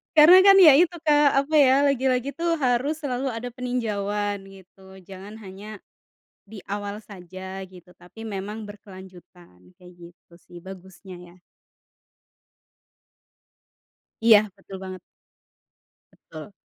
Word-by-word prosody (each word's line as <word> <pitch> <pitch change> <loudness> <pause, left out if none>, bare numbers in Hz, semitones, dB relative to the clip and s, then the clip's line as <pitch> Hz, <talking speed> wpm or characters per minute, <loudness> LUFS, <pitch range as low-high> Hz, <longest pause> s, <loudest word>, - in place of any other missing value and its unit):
Karena, 320 +4 +8
kan, 390 - +7
ya, 315 -5 +9
itu 350 0 +2
Kak, 295 -2 +3
apa, 300 +3 -7
ya, 265 -2 +5
lagi-lagi, 265 -1 0
tuh, 335 +3 -2
harus 270 0 -1
selalu 260 -1 -3
ada 240 +2 -6
peninjauan 210 -5 -3
gitu, 190 0 -17
jangan 195 +3 -12
hanya 200 +2 -11 0.6
di 205 0 -13
awal 205 0 -6
saja, 190 -2 -10
gitu. 180 -2 -15
Tapi 180 +6 -13
memang 210 +1 -7
berkelanjutan, 185 - -16
kayak 180 0 -16 0.2
gitu, 175 - -34
sih, 175 0 -16
bagusnya, 190 +1 -13
ya. 175 -1 -16 2.9
Iya, 225 -2 +6 0.2
betul 195 0 -12
banget. 185 -1 -8 1.1
Betul. 160 +4 -13
205 Hz, 115 wpm, -23 LUFS, 190-250 Hz, 2.9 s, ya